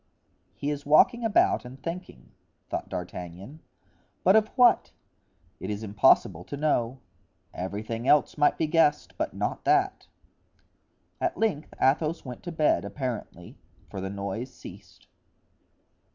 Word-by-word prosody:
"He 145 - -2
is 145 -1 -4
walking 235 - +4
about 225 -3 +3
and 125 +2 -11
thinking," 150 - -7 0.4
thought - - -3
D'Artagnan; 90 - -7 0.6
"but 190 +3 +5
of 215 -1 +4
what? 245 -2 +5 0.7
It 95 - -5
is 105 +1 -4
impossible 100 -5 +3
to 145 - -6
know; 135 -4 0 0.6
everything 110 +6 -4
else 150 - +4
might 145 -1 +3
be 160 - +1
guessed, 155 -1 +2
but - - -3
not - - -3
that." 375 +1 +2 1.1
At 350 -1 -1
length 195 -9 -1
Athos 155 +4 +1
went 125 -2 -8
to 175 - -6
bed, 155 - +2
apparently, 105 - -6 0.3
for 95 - -5
the 95 - -4
noise 100 +6 -5
ceased. - - -13
135 Hz, 130 wpm, -27 LUFS, 100-165 Hz, 1.1 s, but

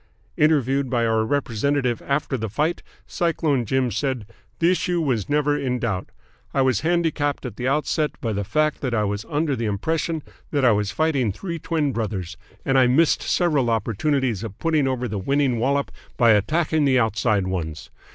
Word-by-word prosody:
"Interviewed 140 -3 +2
by 120 -2 +1
our 110 -1 +2
representative 125 0 0
after 140 -1 -1
the 110 -3 -3
fight, 155 - -1 0.2
Cyclone 160 -7 0
Jim 130 +1 0
said: 130 0 -2 0.3
'The 170 +2 +3
issue 180 -1 0
was 125 - -1
never 145 0 +2
in 130 -3 -1
doubt. 110 -6 -2 0.5
I 135 - +4
was 130 -6 +2
handicapped 160 -4 0
at 120 -5 -6
the 125 +2 -3
outset 150 +2 0
by 115 -2 -2
the 100 0 -2
fact 155 +8 0
that 125 -4 -1
I 105 - +1
was 105 +1 -3
under 150 -1 0
the 115 -3 -2
impression 160 - -1 0.3
that 140 -3 +1
I 120 - +6
was 105 -1 +1
fighting 140 -3 +1
three 170 - -5
twin 155 -3 0
brothers, 95 -6 -3 0.3
and 135 0 +3
I 125 - +5
missed 150 +6 +3
several 150 -9 +1
opportunities 115 +1 0
of 105 -3 -7
putting 155 -4 +1
over 125 -1 -1
the 105 -3 -3
winning 135 +2 +1
wallop 140 +4 0 0.3
by 120 -3 +5
attacking 155 - +2
the 130 -2 +4
outside 110 -3 +1
ones. 85 -4 -4
130 Hz, 180 wpm, -23 LUFS, 110-150 Hz, 0.5 s, I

